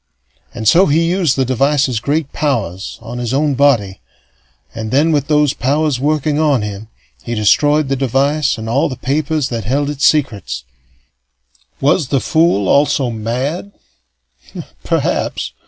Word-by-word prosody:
And 110 -2 -3
so 180 - +5
he 165 +3 +2
used 180 -7 +1
the 135 - +1
device's 135 -1 +1
great 145 +3 -2
powers 110 - -2
on 120 +1 -7
his 120 +1 -2
own 145 0 +1
body; 120 -9 +1 0.7
and 110 -1 -5
then, 145 +7 +2
with 145 -3 0
those 150 -2 +2
powers 145 0 0
working 150 +1 0
on 145 -7 +2
him, 105 +1 -6 0.3
he 120 - -5
destroyed 145 +8 +2
the 135 - 0
device 135 +3 0
and 110 0 -6
all 130 +6 +1
the 130 - -5
papers 145 +2 -1
that 115 -4 -4
held 140 +5 0
its 145 -1 -6
secrets. 125 - +1 1.2
Was 150 +1 +2
the 135 - +1
fool 160 - +1
also 140 -1 +2
mad? 130 - -4 1.1
Perhaps. - - -1
140 Hz, 145 wpm, -16 LUFS, 120-150 Hz, 1.2 s, so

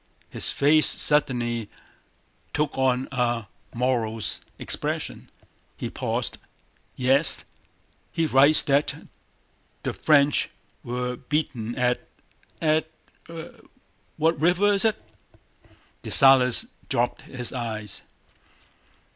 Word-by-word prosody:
His - - +1
face 150 +2 +4
suddenly 120 -6 +3 0.9
took 150 0 -1
on 130 -1 +1
a 120 -3 -1 0.3
morose 115 -3 -1 0.2
expression. - - -4 0.5
He - - -5
paused. - - -2 0.6
"Yes, 135 +4 +2 0.7
he 165 -1 0
writes 145 +1 +5
that 140 +1 +1 0.9
the - - -2
French 145 -2 +2 0.3
were 125 +1 -4
beaten 130 -5 -3
at... 125 -1 -1 0.6
at... 155 0 +1 1.3
what 160 -1 +1
river 180 +5 +3
is 200 +1 +1
it?" 220 - +1 1.0
Dessalles 130 -2 +5 0.2
dropped 120 +1 -1
his 125 -1 -4
eyes. 110 -4 -5
130 Hz, 90 wpm, -24 LUFS, 120-150 Hz, 1.3 s, writes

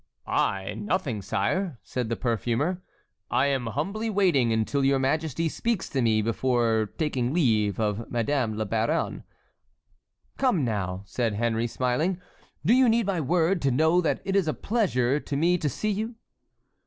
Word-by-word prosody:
"I? 95 +1 0
Nothing, 110 - -2
sire," 140 - -1
said 125 -3 -3
the 115 - 0
perfumer, 120 - -1 0.5
"I 130 - +2
am 135 -4 0
humbly 195 - -2
waiting 180 - +3
until 110 +5 0
your 135 0 +3
majesty 155 +4 0
speaks 230 +5 -2
to 135 - -1
me, 110 -2 +2
before 115 -2 +1
taking 130 -6 0
leave 110 - +2
of 110 +1 -1
Madame 120 -2 0
la 110 - -1
Baronne." 115 +10 -1 1.2
"Come, 240 - +2
now!" 95 -4 -2
said 110 +3 -1
Henry, 115 +1 0
smiling. 130 +10 0 0.5
"Do 215 - +5
you 255 -1 +5
need 230 0 +2
my 190 -4 0
word 170 +4 +1
to 140 - +2
know 160 +7 +3
that 165 - 0
it 195 - -1
is 195 -5 +2
a 155 - 0
pleasure 145 - +1
to 145 -1 -4
me 175 +4 +2
to 150 - 0
see 215 - -2
you?" 220 +4 -3
135 Hz, 160 wpm, -26 LUFS, 115-175 Hz, 1.2 s, Do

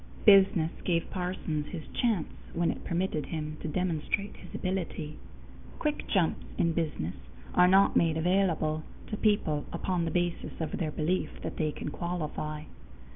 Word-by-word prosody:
Business 195 -5 +7
gave 170 -2 0
Parsons 180 -5 -2
his 165 -5 -6
chance 220 -10 +1 0.3
when 170 0 +2
it - - -7
permitted 170 -3 -1
him 155 -1 -4
to - - -3
demonstrate 180 +4 -1
his - - -11
ability. 175 -5 -3 0.6
Quick 300 -1 -1
jumps 180 -6 +2
in 170 -1 +3
business 150 - -1 0.4
are 180 0 +6
not 195 +2 +5
made 165 -2 +4
available 165 -3 +2 0.3
to 210 - -1
people 170 -10 +2
upon 180 -3 0
the - - 0
basis 175 +1 -1
of 160 -2 -2
their 160 - 0
belief 160 +4 0
that - - -4
they 155 -2 +1
can 150 - -5
qualify. 155 -3 -3
170 Hz, 150 wpm, -30 LUFS, 155-185 Hz, 0.6 s, Business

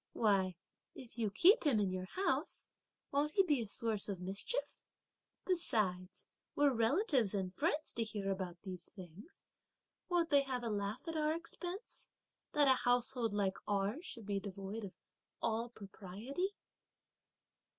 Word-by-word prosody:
Why, 195 -5 +2 0.4
if 240 -2 -10
you 220 -2 +1
keep 365 - +6
him 275 -9 +4
in 200 -3 +1
your 185 0 -3
house, 390 - 0 0.5
won't 290 +2 +1
he 390 - +5
be 295 -8 +2
a 225 - -4
source 215 0 0
of 195 -3 -3
mischief? 195 - -3 0.7
Besides, 200 - 0 0.3
were 285 -2 +4
relatives 245 - +3
and 185 -2 -2
friends 305 - 0
to 230 - +1
hear 205 -3 -3
about 185 -2 -4
these 185 -3 -7
things, 185 - -12 0.7
won't 345 -2 +2
they 285 -1 +7
have 260 -3 -2
a 230 - -1
laugh 205 - -3
at 325 - -3
our 305 0 +2
expense, 355 +5 -5 0.4
that 295 -2 +5
a 260 -1 +5
household 245 -1 +2
like 200 -2 0
ours 205 - 0
should 230 - -8
be 200 -1 0
so 195 - -12
devoid 200 +3 -5
of 190 - -9 0.5
all 230 +1 0
propriety?" 220 - -5
225 Hz, 150 wpm, -36 LUFS, 195-290 Hz, 0.7 s, they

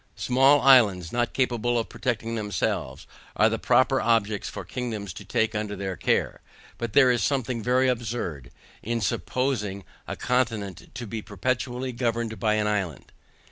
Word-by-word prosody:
Small 135 +3 +4
islands 105 -11 +5
not 120 0 0
capable 120 -2 0
of 115 - -1
protecting 115 -1 -3
themselves, 100 - -2 0.3
are - - +4
the - - -2
proper - - +3
objects 110 -3 +1
for - - -7
kingdoms 110 -7 -5
to 100 - -9
take 110 +3 0
under 105 -1 -3
their 95 -2 -4
care; - - 0 0.4
but 115 -3 -4
there 130 -3 +6
is 120 - +1
something 130 -4 -1
very 125 +3 +2
absurd, 115 - -3 0.3
in 115 +1 -2
supposing 105 -1 -1 0.2
a - - -4
continent 110 -7 -1
to 120 +1 -5
be 110 0 -5
perpetually 125 +5 -2
governed 115 -2 -2
by 110 -2 +2
an 105 0 +1
island. 100 -9 -2
115 Hz, 155 wpm, -26 LUFS, 105-125 Hz, 0.4 s, there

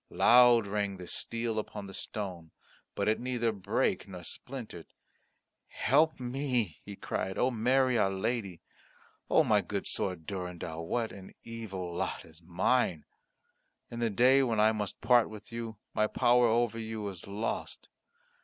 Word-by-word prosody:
Loud 120 -2 +6
rang 100 -1 -2
the 90 - -8
steel 115 +4 -2
upon 105 -1 -6
the 95 - -9
stone; 90 -6 -5 0.5
but - - -1
it 110 - +2
neither 120 -2 0
brake 100 -1 -1
nor 90 -2 -9
splintered. 115 -7 -7 0.8
"Help 155 +3 +2
me," 125 - -1
he 100 - -8
cried, 95 0 -3
"O 130 - +2
Mary, 125 +1 +2
our 95 - +3
Lady. 95 -2 -2 0.7
O - - +5
my - - +3
good - - -4
sword, 90 -3 -2
my - - -24
Durendal, 85 -3 -5
what 115 +1 -1
an 95 -1 -12
evil 95 -6 -6
lot 95 +2 -3
is 80 +1 -16
mine! 90 0 +1 0.9
In 120 - -5
the 115 -1 +1
day 125 +6 +5
when 115 -5 +1
I 110 +1 +5
must 105 -3 -4
part 120 -1 +4
with 105 0 -11
you, 115 -2 -5 0.2
my 110 - +2
power 120 +2 +4
over 115 0 +1
you 110 -2 -4
is 95 -3 -7
lost. 105 +3 -4
110 Hz, 155 wpm, -30 LUFS, 95-120 Hz, 0.9 s, Loud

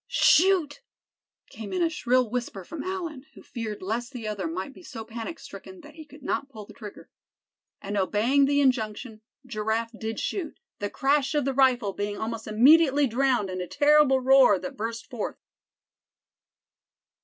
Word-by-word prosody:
"Shoot!" 335 -3 +3 0.7
came 220 -3 -8
in 360 - 0
a 335 - +2
shrill 255 -4 +1
whisper 235 -4 -4
from 315 - -7
Allan, 335 -7 -5
who - - -14
feared 220 -5 -6
lest 235 +6 -3
the 230 -4 -6
other 200 -5 -3
might 185 +10 -5
be - - -15
so 230 -10 -9
panic 230 +8 -6
stricken 370 -1 -11
that 300 -1 -14
he 315 0 -11
could 290 -1 -16
not 275 - -2
pull 215 -6 -10
trigger. 210 0 -12 0.7
And 200 +1 -4
obeying 220 +8 +2
the 285 +1 +2
injunction, 225 -3 -1 0.2
Giraffe 225 0 -2
did 225 0 -5
shoot, 350 -7 -4 0.2
the 205 - -3
crash 280 +3 +1
of 295 -3 +1
the 275 - 0
rifle 250 -6 +2
being 205 +1 -4
almost 225 0 -5
immediately 285 +6 +5
drowned 245 -5 +1
in 185 0 -4
a 180 - -5
terrible 290 - +4
roar 260 -5 +5
that 275 +8 -7
burst 230 +1 -5
forth. 245 -5 -5
250 Hz, 165 wpm, -26 LUFS, 215-285 Hz, 0.7 s, immediately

